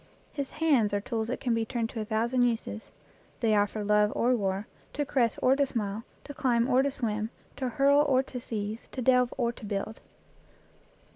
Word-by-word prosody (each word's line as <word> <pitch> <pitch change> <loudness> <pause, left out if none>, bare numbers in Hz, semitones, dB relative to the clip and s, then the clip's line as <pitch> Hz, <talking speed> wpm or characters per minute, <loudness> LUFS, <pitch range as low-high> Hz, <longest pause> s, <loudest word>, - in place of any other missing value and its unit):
His 280 -2 -3
hands 260 -11 +3
are - - +1
tools 220 +2 -3
that 250 - -3
can 245 -3 0
be 230 0 +1
turned 230 0 -2
to 225 - -4
a - - -3
thousand 235 +4 0
uses. 230 -2 -1 0.5
They 225 -2 +2
are 205 -1 +4
for 210 +1 -5
love 210 0 +3
or 250 +2 +3
war, 195 -2 -1 0.3
to 290 - -1
caress 245 -5 +1
or 260 +1 +5
to 285 - +3
smite, 210 -4 -3 0.2
to 285 - -8
climb 240 -3 +1
or 260 0 +4
to 280 - +1
swim, 220 -5 -2 0.3
to 260 -2 -1
hurl 280 +4 +4
or 270 -3 +3
to 255 -1 -7
seize, 215 -1 -5
to 255 - -3
delve 250 0 +4
or 235 -2 +1
to 235 - -14
build. 205 +2 -4
235 Hz, 205 wpm, -28 LUFS, 215-260 Hz, 0.5 s, or